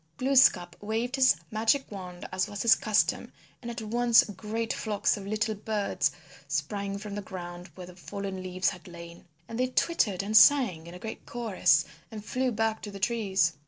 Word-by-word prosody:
Glooskap 255 Hz, -10 st, +4 dB
waved 225 Hz, +5 st, -2 dB
his 265 Hz, -1 st, +5 dB, 0.2 s
magic 225 Hz, +6 st, +2 dB
wand 180 Hz, -3 st, -8 dB
as 185 Hz, +2 st, 0 dB
was 205 Hz, -1 st, -4 dB
his 230 Hz, -, +7 dB
custom, 215 Hz, 0 st, +1 dB, 0.3 s
and 240 Hz, -, -6 dB
at 235 Hz, -1 st, -6 dB
once 235 Hz, +1 st, +4 dB
great 220 Hz, +4 st, -3 dB
flocks 210 Hz, -2 st, 0 dB
of 200 Hz, -2 st, -8 dB
little 215 Hz, +2 st, -1 dB
birds 210 Hz, -6 st, -1 dB, 0.4 s
sprang 195 Hz, +8 st, -3 dB
from 205 Hz, 0 st, -7 dB
the 205 Hz, -, -4 dB
ground 175 Hz, -2 st, -8 dB
where 185 Hz, -, -8 dB
the 180 Hz, 0 st, -13 dB
fallen 195 Hz, +1 st, -6 dB
leaves 185 Hz, +1 st, 0 dB
had 185 Hz, -2 st, -12 dB
lain. 170 Hz, 0 st, -11 dB, 0.2 s
And 230 Hz, +1 st, -6 dB
they 255 Hz, -, +2 dB
twittered 250 Hz, -, 0 dB
and 210 Hz, +2 st, -3 dB
sang 215 Hz, -, +6 dB
in 170 Hz, -, -10 dB
a -, -, -7 dB
great 220 Hz, +4 st, -8 dB
chorus 205 Hz, -10 st, +2 dB, 0.2 s
and 215 Hz, -2 st, -9 dB
flew 255 Hz, +2 st, -1 dB
back 220 Hz, 0 st, -1 dB
to 210 Hz, -, -7 dB
the 200 Hz, -, -8 dB
trees. 195 Hz, -6 st, +1 dB
205 Hz, 185 wpm, -28 LUFS, 185-230 Hz, 0.4 s, his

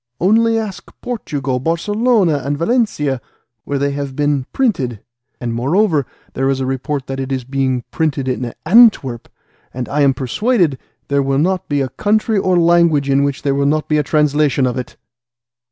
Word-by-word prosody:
Only 225 Hz, +4 st, +3 dB
ask 210 Hz, -5 st, -5 dB
Portugal, 145 Hz, -, -3 dB
Barcelona, 180 Hz, -, +1 dB
and 145 Hz, +2 st, -2 dB
Valencia, 165 Hz, -, 0 dB, 0.4 s
where 140 Hz, -, -2 dB
they 140 Hz, +1 st, 0 dB
have 140 Hz, -1 st, -5 dB
been 145 Hz, -2 st, 0 dB
printed, 140 Hz, -, -1 dB, 0.4 s
and 120 Hz, -1 st, -3 dB
moreover 150 Hz, -, +1 dB, 0.3 s
there 135 Hz, +1 st, 0 dB
is 135 Hz, -1 st, 0 dB
a 130 Hz, -, -1 dB
report 135 Hz, +1 st, -3 dB
that 135 Hz, 0 st, -5 dB
it 135 Hz, 0 st, -4 dB
is 130 Hz, -1 st, -2 dB
being 130 Hz, -1 st, -1 dB
printed 145 Hz, -5 st, -1 dB
at 125 Hz, -2 st, -3 dB
Antwerp, 205 Hz, -, +4 dB, 0.4 s
and 125 Hz, -1 st, -5 dB
I 145 Hz, +1 st, 0 dB
am 135 Hz, -2 st, +3 dB
persuaded 170 Hz, -, 0 dB, 0.3 s
there 140 Hz, 0 st, +1 dB
will 135 Hz, 0 st, 0 dB
not 180 Hz, +5 st, 0 dB
be 145 Hz, -1 st, +1 dB
a 130 Hz, -, -2 dB
country 210 Hz, -, +1 dB
or 185 Hz, -1 st, +2 dB
language 170 Hz, -5 st, +3 dB
in 140 Hz, +1 st, +3 dB
which 140 Hz, -1 st, -2 dB
there 140 Hz, -1 st, +1 dB
will 140 Hz, 0 st, +1 dB
not 155 Hz, +1 st, 0 dB
be 150 Hz, -1 st, +2 dB
a -, -, +3 dB
translation 150 Hz, -2 st, +1 dB
of 125 Hz, -1 st, -1 dB
it." 125 Hz, -1 st, -6 dB
145 Hz, 175 wpm, -17 LUFS, 135-175 Hz, 0.4 s, Antwerp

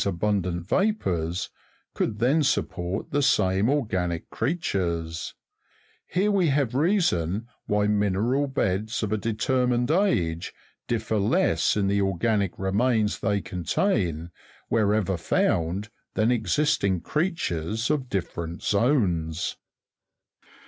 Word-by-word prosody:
abundant 90 Hz, -2 st, -1 dB
vapours, 90 Hz, -, 0 dB, 0.4 s
could 105 Hz, -, -1 dB
then 130 Hz, +8 st, +3 dB
support 95 Hz, -8 st, -1 dB
the 145 Hz, -, +1 dB
same 95 Hz, -3 st, +3 dB
organic 95 Hz, -, -1 dB
creatures; 85 Hz, -, -2 dB, 0.7 s
here 200 Hz, +3 st, +1 dB
we 190 Hz, -4 st, +3 dB
have 140 Hz, -4 st, +1 dB
the 130 Hz, -, 0 dB
reason 115 Hz, -, +1 dB, 0.2 s
why 105 Hz, 0 st, +2 dB
mineral 105 Hz, +7 st, +1 dB
beds, 110 Hz, -4 st, -1 dB
of 105 Hz, -, -2 dB
a 110 Hz, -, +1 dB
determined 120 Hz, +3 st, 0 dB
age, 95 Hz, -, +1 dB, 0.3 s
differ 110 Hz, -2 st, -1 dB
less 120 Hz, -, +2 dB
in 100 Hz, -, +1 dB
the 100 Hz, +1 st, +2 dB
organic 95 Hz, 0 st, 0 dB
remains 105 Hz, +3 st, +1 dB
they 100 Hz, -2 st, +1 dB
contain, 90 Hz, -, -1 dB, 0.4 s
wherever 105 Hz, -4 st, +1 dB
found, 85 Hz, +4 st, 0 dB, 0.3 s
than 110 Hz, +2 st, +3 dB
existing 110 Hz, -, +1 dB
creatures 115 Hz, -, -1 dB
of 135 Hz, -4 st, -1 dB
different 85 Hz, -4 st, -4 dB
zones. 90 Hz, -, +1 dB
105 Hz, 105 wpm, -25 LUFS, 90-130 Hz, 0.7 s, then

